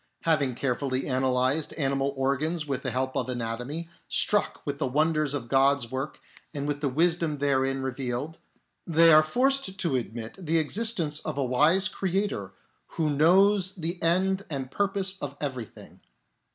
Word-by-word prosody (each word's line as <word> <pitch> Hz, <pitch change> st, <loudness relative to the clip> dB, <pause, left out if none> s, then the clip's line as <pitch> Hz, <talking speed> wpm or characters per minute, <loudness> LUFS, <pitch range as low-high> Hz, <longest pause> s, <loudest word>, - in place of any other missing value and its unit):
Having 145 Hz, -6 st, +1 dB
carefully 130 Hz, 0 st, -1 dB
analysed 130 Hz, +2 st, +1 dB
animal 135 Hz, -1 st, 0 dB
organs 150 Hz, +5 st, 0 dB
with 140 Hz, -3 st, -3 dB
the -, -, -3 dB
help 130 Hz, +1 st, -2 dB
of -, -, -1 dB
anatomy, 125 Hz, +7 st, -4 dB, 0.2 s
struck 205 Hz, -1 st, +1 dB
with 145 Hz, -1 st, -3 dB
the -, -, 0 dB
wonders 155 Hz, +1 st, +1 dB
of 125 Hz, -5 st, -5 dB
God's 135 Hz, -2 st, +3 dB
work 130 Hz, +3 st, -4 dB, 0.4 s
and 140 Hz, 0 st, -3 dB
with 145 Hz, -1 st, -2 dB
the 145 Hz, -, +1 dB
wisdom 165 Hz, +2 st, +1 dB
therein 135 Hz, -1 st, 0 dB
re 130 Hz, -, -1 dB
vealed, 130 Hz, +5 st, -4 dB, 0.5 s
they 165 Hz, 0 st, +6 dB
are 155 Hz, -, +8 dB
forced 250 Hz, -, +1 dB
to 170 Hz, -8 st, 0 dB
admit 115 Hz, -, -5 dB
the 165 Hz, 0 st, +1 dB
existence 165 Hz, -2 st, 0 dB
of 155 Hz, -2 st, -5 dB
a 140 Hz, -, 0 dB
wise 150 Hz, +10 st, +3 dB
Creator 190 Hz, -, -2 dB, 0.5 s
Who 155 Hz, -2 st, +1 dB
knows 185 Hz, +6 st, +4 dB
the 170 Hz, 0 st, -4 dB
end 190 Hz, +3 st, +2 dB
and 135 Hz, -4 st, -4 dB
purpose 195 Hz, 0 st, 0 dB
of 140 Hz, 0 st, -5 dB
everything. 130 Hz, -6 st, -7 dB
145 Hz, 155 wpm, -27 LUFS, 130-170 Hz, 0.5 s, are